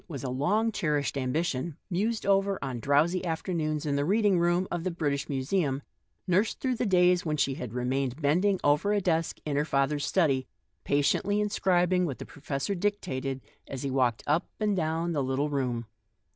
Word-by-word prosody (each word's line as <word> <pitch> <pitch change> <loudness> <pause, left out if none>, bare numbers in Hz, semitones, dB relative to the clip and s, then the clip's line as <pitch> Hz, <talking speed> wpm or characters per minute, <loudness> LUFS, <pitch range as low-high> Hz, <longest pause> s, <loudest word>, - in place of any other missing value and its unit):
61 170 - -9
was 140 - -6
a 130 - -2
long 205 - +1
cherished 150 -9 -1
ambition, 140 +3 -1
mused 215 +5 -1
over 195 0 +2
on 130 -3 -3
long, - - -6
drowsy 150 +8 +2
afternoons 160 -3 -2
in 145 -1 0
the 140 - +1
reading 200 +2 +3
room 175 +2 +2
of 175 -1 -2
the 185 - 0
British 145 -5 -2
Museum, 140 0 -1 0.4
nursed 190 +5 +1
during 255 -2 -1
the 235 - 0
days 180 -1 +4
when 155 -2 -1
she 140 -1 +1
had 125 -4 -6
remained 130 +2 -1
bending 180 +7 +2
over 150 +8 +3
a 205 - +2
desk 165 -4 0
in 150 -2 -1
her 145 - +2
father's 145 0 0
study, 145 -5 +1 0.4
patiently 145 +8 +1
inscribing 185 -3 +2
what 135 - -4
the - - -7
professor 140 +5 -3
dictated 140 -9 -2 0.3
as 135 -1 -6
he 135 - -2
walked 125 -4 +1
up 155 +5 +1
and 210 -2 +1
down 165 0 -1
the 150 -4 0
little 135 +3 -1
room. 125 -4 -1
155 Hz, 185 wpm, -28 LUFS, 140-185 Hz, 0.4 s, days